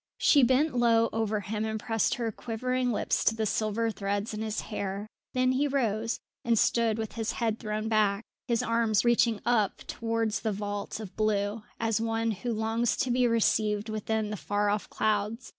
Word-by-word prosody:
She 290 - +5
bent 260 +3 +3
low 230 -1 +4
over 215 -1 0
him 210 +2 -3
and 220 0 -2
pressed 225 -1 0
her 230 -2 -2
quivering 250 +3 -2
lips 210 - 0
to 225 - +3
the 220 -1 -1
silver 220 +2 0
threads 200 +1 -2
in 215 - -4
his 220 -1 -2
hair; 200 -1 -4 0.3
then 255 0 +3
he 275 +3 +2
rose, 230 -5 0 0.2
and 235 -1 +2
stood 230 0 +2
with 220 -1 -3
his 225 -1 -2
head 225 -2 -1
thrown 215 0 -3
back, 215 -1 +2 0.2
his 235 -1 +1
arms 230 -3 +2
reaching 235 -2 +3
up 215 -5 +1
towards 225 -1 -1
the 220 - -1
vault 205 +1 -4
of 210 -4 -8
blue, 210 0 0 0.2
as 225 -1 0
one 225 0 0
who 235 +4 -3
longs 225 +1 0
to 255 - 0
be 250 0 +3
received 215 -2 +1
within 215 0 -2
the 210 - -3
far 205 +2 0
off 205 0 -2
clouds. 215 +2 -1
220 Hz, 185 wpm, -29 LUFS, 210-230 Hz, 0.3 s, She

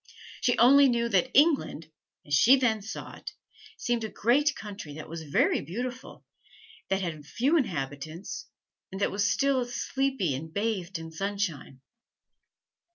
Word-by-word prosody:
She 245 - +2
only 275 +3 +7
knew 235 -1 +1
that 220 +5 +2
England, 275 - +2 0.3
as 145 - -6
she 240 - +7
then 235 -5 +1
saw 220 - -7
it, - - -9 0.4
seemed 240 -2 -1
a 220 - -3
great 280 +9 +2
country 195 -8 -8
that 155 - -8
was 165 0 -7
very 150 -3 +1
beautiful, 245 +8 -6 0.6
that 195 0 +1
had 160 -4 -4
few 260 - 0
inhabitants, 165 - -3 0.4
and 190 - -6
that 200 - +1
was 205 +1 +1
still 275 -2 +2
and 245 - -4
sleepy 265 - -1
and 155 +5 -6
bathed 195 -2 -2
in 165 0 -8
sunshine. 180 -7 -4
205 Hz, 150 wpm, -28 LUFS, 165-250 Hz, 0.6 s, only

